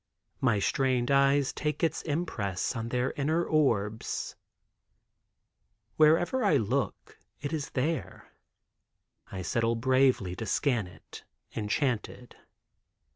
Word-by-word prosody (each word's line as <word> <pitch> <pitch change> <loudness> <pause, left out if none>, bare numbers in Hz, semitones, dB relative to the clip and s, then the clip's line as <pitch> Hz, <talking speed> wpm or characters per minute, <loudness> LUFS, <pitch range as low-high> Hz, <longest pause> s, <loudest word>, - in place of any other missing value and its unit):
My 115 -5 +2
strained 130 +3 +1
eyes 140 0 +3
take 150 +1 -3
its 165 - +1
impress 130 - -2
on 115 0 -3
their 125 +1 0
inner 160 +4 0
orbs. 110 -9 0 1.6
Wherever 165 +11 +4
I 165 -9 +4
look 125 +4 -2 0.2
it 145 +2 -4
is 150 -3 -3
there. 145 +3 -3 1.0
I 95 -1 -5
settle 115 +6 +1
bravely 130 -6 +2
to 110 - -4
scan 120 -3 +1
it, 90 - -13 0.3
enchanted. 120 +2 -2
130 Hz, 105 wpm, -29 LUFS, 115-150 Hz, 1.6 s, Wherever